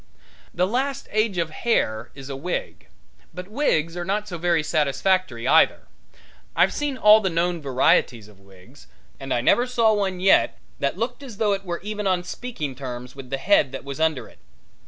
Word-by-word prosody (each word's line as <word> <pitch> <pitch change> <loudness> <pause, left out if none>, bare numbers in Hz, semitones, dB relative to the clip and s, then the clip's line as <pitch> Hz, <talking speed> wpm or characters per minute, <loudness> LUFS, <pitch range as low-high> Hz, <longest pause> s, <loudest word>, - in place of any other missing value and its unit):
The 180 +1 +1
last 260 +6 -2
age 215 -2 0
of 165 -2 -1
hair 120 - -1
is 135 -1 -10
a 140 - -5
wig. 175 +7 -5 0.5
But 180 +1 -8
wigs 170 - 0
are 175 - -3
not 205 +3 -2
so 175 -4 -6
very 170 -2 +1
satisfactory 150 -3 0
either. - - +4 0.7
I've - - +3
seen 290 -3 -2
all 215 -1 +7
the 190 - 0
known 170 0 -1
varieties 130 -5 +1
of 105 -2 -19
wigs, 100 +7 -18 0.3
and 135 -1 -7
I 120 - +1
never 245 - +3
saw 230 -3 +3
one 195 -3 -1
yet 190 +1 +3 0.2
that 140 +5 -1
looked 230 +6 -3
as 250 -7 -10
though 210 -2 +2
it 195 0 -4
were 175 -1 -4
even 210 -1 -3
on 185 -2 +1
speaking 180 - -5
terms 125 -1 -8
with 135 -2 -10
the 135 - -2
head 150 -5 +3
that 135 - -6
was 140 +1 -6
under 160 -4 0
it. - - -20
175 Hz, 190 wpm, -23 LUFS, 135-210 Hz, 0.7 s, all